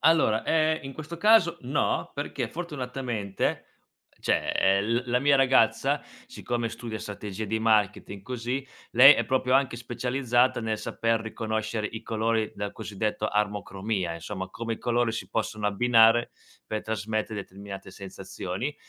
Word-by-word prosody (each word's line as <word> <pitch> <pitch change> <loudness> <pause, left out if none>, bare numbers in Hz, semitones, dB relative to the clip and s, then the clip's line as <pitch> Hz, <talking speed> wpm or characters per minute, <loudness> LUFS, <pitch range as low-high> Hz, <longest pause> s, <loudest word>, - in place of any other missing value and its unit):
Allora, 160 -9 +4
ehm, 155 0 +2
in 135 - -6
questo 155 +4 -7
caso 175 -3 +4
no, 135 +4 0
perché 140 -4 -3
fortunatamente 125 - -3 0.6
cioè, - - +1
ehm, 100 +1 +3
l 115 +3 +1
la 125 - +3
mia 140 +1 +4
ragazza, 130 -4 +3 0.2
siccome 120 -1 -3
studia 110 -1 -6
strategie 105 0 -6
di 110 +2 -1
marketing 105 -3 +1
così, 125 +3 -3 0.3
lei 135 +4 +10
è - - 0
proprio 130 -1 0
anche 135 -3 +2
specializzata 125 +1 +1
nel 110 -1 -2
saper 115 -1 0
riconoscere 110 -1 -3
i 110 - -7
colori 110 0 0
dal 100 0 -4
cosiddetto 105 +1 -3
armocromia, 100 -3 -1
insomma 95 +3 -6
come 115 +3 -4
i - - -14
colori 120 -1 +1
si 115 - -5
possono 110 -1 -2
abbinare 115 +2 +4 0.4
per 110 -1 -3
trasmette 110 0 -2
determinate 100 -1 -8
sensazioni, 95 +6 -5
115 Hz, 140 wpm, -27 LUFS, 105-125 Hz, 0.6 s, lei